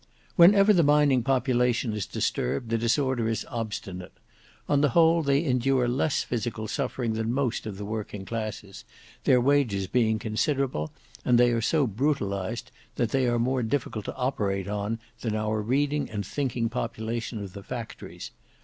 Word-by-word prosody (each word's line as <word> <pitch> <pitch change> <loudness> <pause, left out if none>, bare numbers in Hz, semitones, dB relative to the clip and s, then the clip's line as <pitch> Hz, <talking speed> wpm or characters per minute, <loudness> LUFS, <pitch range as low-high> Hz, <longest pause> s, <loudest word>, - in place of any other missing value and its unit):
"Whenever 200 +4 +7
the 175 - +5
mining 145 -3 +4
population 125 -2 +1
is 105 -3 -3
disturbed 110 - -2
the 115 - +2
disorder 120 0 +1
is 115 - -2
obstinate. 105 -5 -5 0.5
On 145 -1 +3
the 145 - +4
whole 165 0 +5
they 140 0 +2
endure 130 -2 +2
less 135 +5 +1
physical 115 -2 -3
suffering 115 +1 -2
than 110 +1 -1
most 125 -3 -1
of 100 -3 -6
the 100 - -5
working 105 -2 -5
classes, 110 -3 -5 0.4
their 125 - +5
wages 120 -7 +2
being 110 +1 +2
considerable; 110 - -1 0.3
and 125 -1 +4
they 120 0 +5
are 115 -1 0
so 150 +5 +2
brutalized 110 -3 -2 0.2
that 120 -2 0
they 135 -2 +2
are 120 0 +2
more 125 +2 +1
difficult 115 -3 -2
to - - -5
operate 105 -8 -1
on 105 +2 -2 0.2
than 110 -3 -2
our 110 0 -1
reading 145 +6 0
and 105 -2 -4
thinking 120 +2 -1
population 115 0 -3
of 100 -3 -7
the 100 - -8
factories. 115 +3 -7
120 Hz, 160 wpm, -27 LUFS, 110-135 Hz, 0.5 s, Whenever